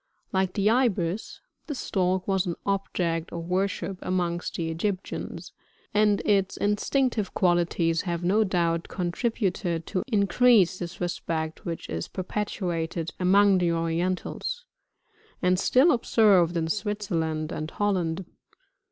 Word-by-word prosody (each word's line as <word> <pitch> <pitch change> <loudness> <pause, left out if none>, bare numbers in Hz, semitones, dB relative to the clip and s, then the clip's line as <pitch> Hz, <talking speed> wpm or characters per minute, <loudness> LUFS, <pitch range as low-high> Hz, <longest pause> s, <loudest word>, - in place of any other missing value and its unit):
Like 190 -1 +1
the 200 0 +1
Ibis, 220 -6 +1 0.3
the 295 - -3
Stork 185 -5 0
was 190 -1 +1
an 170 - -2
object 175 -4 -1
of 170 -1 -5
worship 185 0 -1
amongst 175 -1 -2
the 165 -1 -2
Egyptians; 185 +3 -4 0.4
and 210 -1 +3
its 195 -2 +2
instinctive 215 +2 0
qualities 170 -2 +2
have 175 -2 -3
no 205 +5 +3
doubt 170 -4 0
con 175 -2 -2
tributed 185 -6 -1
to 185 - -2
increase 200 -3 +4
this 175 0 -6
respect 165 -2 -3
which 170 -1 -4
is 80 +1 -4
perpetuated 175 -4 -3
among 195 +1 +5
the 175 -1 +2
orientals, 180 - -2 0.7
and 180 0 +2
still 260 - +5
observed 200 - +4
in 160 -1 0
Switzerland 170 -6 -2
and 155 +1 -4
Holland. 185 -3 -1
185 Hz, 125 wpm, -26 LUFS, 170-205 Hz, 0.7 s, among